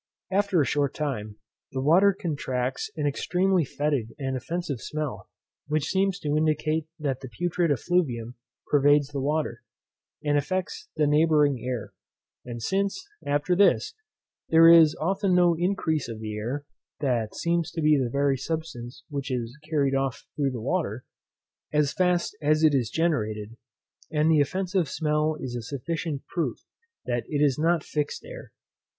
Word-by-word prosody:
After 200 -2 +2
a 145 - +3
short 140 -1 0
time, 110 -9 -3 0.4
the 130 - -2
water 180 +7 +6
contracts 130 -5 -2
an 150 - -1
extremely 180 +5 +1
fetid 140 -4 -2
and 135 -2 -2
offensive 145 -1 -3
smell, 155 -2 -4 0.4
which 150 -1 0
seems 195 0 +1
to 145 0 0
indicate 155 0 +1
that 140 -5 -2
the 130 - -8
putrid 175 +6 0
effluvium 130 -6 0 0.3
pervades 145 0 +4
the 140 -2 -3
water, 145 -4 -1 0.6
and 145 -1 +2
affects 185 +5 -3
the 155 -1 +2
neighbouring 150 -3 +3
air; 125 -3 -4 0.5
and 120 -2 -7
since, 200 - -1 0.2
after 145 +5 +1
this, 200 +2 +3 0.6
there 165 0 +7
is 165 -2 +8
often 190 +3 +1
no 175 -1 +5
increase 160 -6 0
of 115 -2 -6
the 110 -1 -5
air, 125 +7 -4 0.3
that 120 -6 -1
seems 170 -1 0
to - - -6
be 155 0 +5
the 130 -4 +1
very 140 +1 +1
substance 125 -6 -5
which 140 -2 -4
is 120 -1 -3
carried 140 -4 +2
off 135 -2 -1
through 140 -2 +1
the 125 -3 -5
water, 130 - -2 0.7
as 150 -2 +2
fast 180 -1 +1
as 155 +1 +2
it 155 -2 +6
is 125 -6 +1
generated; 110 -10 -1 0.5
and 155 +1 +2
the 155 -2 +5
offensive 185 +1 0
smell 155 0 0
is 125 -2 -5
a 120 - -3
sufficient 145 +4 -4
proof 170 -2 -2 0.5
that 120 -1 -1
it 145 -1 +1
is 140 -1 +1
not 165 0 +2
fixed 150 - -3
air. - - -10
150 Hz, 155 wpm, -26 LUFS, 130-165 Hz, 0.7 s, is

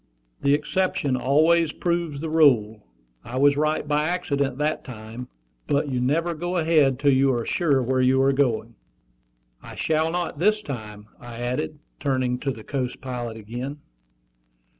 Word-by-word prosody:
"The 140 +1 +4
exception 150 -3 0
always 155 +5 +3
proves 170 -5 -2
the 160 - -3
rule. 115 - +3 0.4
I 125 +2 -6
was 140 +1 +5
right 155 0 0
by 150 +1 +1
accident 140 -6 -1
that 150 +1 -1
time. 115 0 -9 0.4
But 145 +1 +1
you 125 -2 -1
never 165 +7 +1
go 175 +3 -3
ahead 155 -5 +3
till 140 +1 +3
you 135 +1 +4
are 120 -1 -2
sure 145 -7 +1
where 130 +1 +1
you 130 +1 +3
are 135 0 +3
going." 120 -4 0 0.9
"I - - -11
shall 160 0 +1
not 175 -4 -3
this 210 +4 +2
time," 105 -6 -7
I 120 -1 -10
added, 125 +6 -3 0.2
turning 130 -3 0
to 140 - -2
the 110 -4 -9
Coast 130 -1 -3
Pilot 120 -3 -5
again. 120 +6 -6
140 Hz, 160 wpm, -24 LUFS, 125-155 Hz, 0.9 s, was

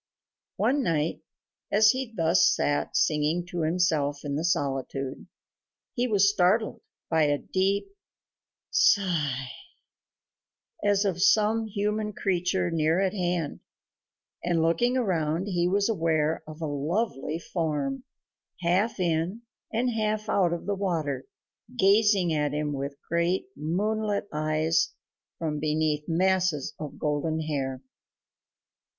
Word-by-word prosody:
One 280 +2 +2
night, 160 - 0 0.5
as 215 +1 +6
he 260 -2 -4
thus 165 -3 +3
sat 145 0 0
singing 155 +3 +1
to 175 - -2
himself 155 -4 +1
in 140 -1 -2
the 155 - -1
solitude, 135 -5 -2 0.7
he 245 0 0
was 200 -3 +4
startled 200 +3 +2 0.3
by 160 -2 +3
a 145 0 +2
deep 195 - 0 0.8
sigh, 150 - +2 1.3
as 205 0 +3
of 180 -3 -1
some 215 +3 +3
human 210 +1 -2
creature 180 -2 0
near 160 +1 +2
at 195 0 +1
hand, 175 -5 -2 0.8
and 170 -2 +1
looking 240 +11 +2
around 170 -6 0
he 175 -3 0
was 200 +2 +2
aware 160 -6 +1
of 155 +1 -10
a - - -1
lovely 150 - -2
form, 170 - -2 0.6
half 190 +6 +1
in 175 +5 -1 0.3
and 245 +2 0
half 215 -1 -1
out 185 -5 +2
of 170 - -4
the 205 - 0
water, 160 -9 -2 0.5
gazing 200 -4 +4
at 150 -1 0
him 150 0 -1
with 140 +1 -4
great 170 +2 0
moonlit 205 +6 -1
eyes 155 +1 +1 0.4
from 155 -2 -2
beneath 150 0 0
masses 180 -3 +1
of 150 -2 -7
golden 155 +2 -1
hair. 135 -4 -3
170 Hz, 120 wpm, -27 LUFS, 155-200 Hz, 1.3 s, as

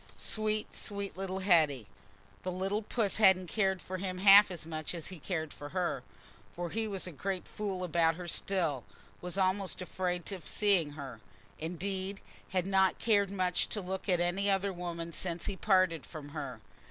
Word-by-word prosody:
Sweet—sweet 215 -2 -1
little 190 0 -3
Hetty! 155 - +4 0.6
The 185 - -3
little 195 +4 -1
puss 215 -2 0
hadn't 190 -4 +6
cared 190 0 0
for 185 - -4
him 185 -1 -3
half 200 +2 +9
as 175 -4 -6
much 155 +1 -4
as 165 - -5
he 185 -3 -9
cared 160 -2 -3
for 145 - -8
her; 180 0 -1 0.5
for 175 -1 -4
he 225 0 -1
was 195 -3 -1
a 180 - -5
great 185 +4 -3
fool 195 -3 -3
about 165 -2 +3
her 175 0 -7
still—was 170 - -3
almost 190 0 +1
afraid 180 0 -2
of 185 -4 -7
seeing 190 -8 +2
her—indeed, 155 - -6 0.3
had 185 -1 0
not 190 -1 +3
cared 205 -4 +3
much 185 -2 0
to 210 - -2
look 190 +1 -4
at 180 -2 +3
any 180 +3 +1
other 195 0 +1
woman 170 -1 -5
since 170 -1 -3
he 200 - -2
parted 185 -6 +3
from 150 -3 -9
her. 140 -6 -5
185 Hz, 165 wpm, -32 LUFS, 165-195 Hz, 0.6 s, half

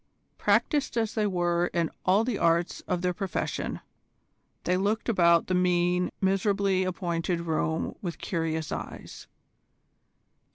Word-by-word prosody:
Practised 290 -5 +1
as 225 -2 0
they 215 -2 +1
were 175 -2 +1
in 170 -2 +1 0.2
all 195 +4 +5
the 230 -3 -2
arts 170 +1 +1
of 180 -1 -1
their 180 0 +1
profession, 195 0 -3 0.8
they 180 - +1
looked 205 +4 0
about 170 -6 +4
the 185 - -2
mean, 180 0 +2
miserably 195 0 +2
appointed 175 -2 -2
room 160 -1 -1
with 175 -4 -4
curious 160 -3 -2
eyes. - - -7
180 Hz, 125 wpm, -28 LUFS, 170-195 Hz, 0.8 s, all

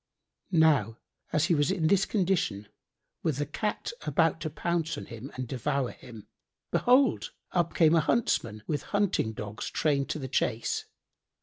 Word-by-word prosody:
Now 150 - +3 0.3
as 155 +1 +2
he 175 - +2
was 145 0 +2
in 185 -4 0
this 190 +4 +3
condition, 175 - 0 0.5
with 155 -5 0
the 145 - 0
Cat 210 +9 -3
about 160 +2 +1
to 155 - -2
pounce 165 0 -1
on - - -6
him 120 +3 -9
and 130 -1 -4
devour 135 +1 -1
him, 115 -4 -12 0.5
behold, 245 - +3 0.2
up 175 -2 0
came 160 -2 +5
a 165 - +5
huntsman, 115 - 0
with 150 - -1 0.2
hunting 195 - +1
dogs 105 -1 -6
trained 140 -3 0
to - - -1
the 135 -3 -5
chase. 115 -2 -1
150 Hz, 160 wpm, -29 LUFS, 125-170 Hz, 0.5 s, came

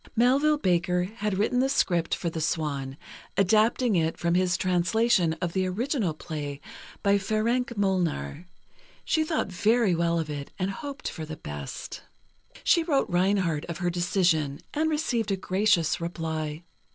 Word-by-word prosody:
Melville 275 +6 +4
Baker 180 -4 +1
had 210 0 -3
written 225 +5 +1
the 265 +1 +2
script 175 -11 +1
for 170 - -3
"The 160 - -4
Swan," 140 -4 -2 0.4
adapting 215 +4 +3
it 165 -1 +1
from 170 0 0
his 180 -1 +2
translation 180 0 +2
of 170 0 -4
the 185 -1 +1
original 215 - -1
play 145 -3 -5 0.4
by 200 0 +4
Ferenc 230 +4 0
Molnar. 175 - -1 0.6
She 315 - +2
thought 310 - -1
very 215 +2 +3
well 170 0 +1
of 160 -2 -1
it, 145 -2 -5
and 190 +1 -1
hoped 285 +6 -6
for 160 - -5
the 155 0 -7
best. 75 -2 -7 0.6
She 340 - +4
wrote 295 - 0
Reinhardt 180 -4 +1
of 170 -1 -5
her 175 -1 -1
decision, 175 -5 +1
and 315 +2 +1
received 250 -8 0
a 195 - +1
gracious 185 -3 +1
reply. 160 -2 -3
185 Hz, 150 wpm, -27 LUFS, 165-220 Hz, 0.6 s, Melville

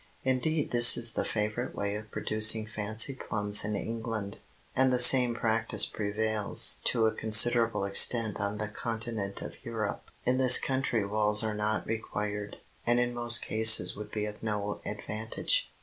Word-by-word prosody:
Indeed 140 +4 -3
this 120 0 +7
is 115 -1 +1
the - - -4
favorite 105 +3 -6
way 100 0 -5
of 105 +1 -10
producing 110 +1 +1
fancy 110 +4 -2
plums 105 -5 +1
in 105 0 -5
England, 110 -2 -7 0.4
and 130 0 0
the 125 - -1
same 125 -1 +6
practise 115 -1 0
prevails 105 0 -1
to 115 -2 0
a 110 - 0
considerable 115 0 +3
extent 110 +2 +3
on 100 0 -5
the 105 +1 -5
continent 110 -2 -6
of - - -13
Europe. 110 -3 -7 0.2
In 130 +1 -1
this 130 -1 +8
country 130 -5 -3
walls 105 +1 0
are 110 -1 -4
not 105 +1 -4
required, 105 -2 -7 0.3
and 120 +1 -1
in 120 0 -3
most 120 0 +2
cases 110 -4 +5
would 105 0 -11
be 105 -1 -5
of 105 0 -11
no 105 -2 -6
advantage. 110 - -4
110 Hz, 160 wpm, -26 LUFS, 105-120 Hz, 0.4 s, this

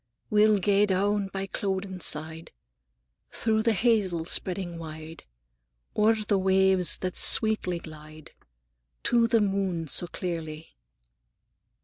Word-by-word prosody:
"We'll 210 0 +4
gae 200 +1 +2
down 200 +1 0
by 195 0 -5
Clouden's 190 -1 -4
side, 160 +1 -3 0.8
Through 220 -1 0
the 230 0 +1
hazels 195 -7 +1
spreading 175 -2 -2
wide, 160 0 -10 0.7
O'er 215 +2 +3
the 200 - +2
waves 190 -2 +3
that 185 -1 -3
sweetly 215 -5 +3
glide, 155 -1 -12 0.7
To 235 -1 +2
the 230 -1 +2
moon 195 -5 -1
sae 175 +5 -1
clearly. 165 -3 -6
190 Hz, 110 wpm, -26 LUFS, 165-205 Hz, 0.8 s, We'll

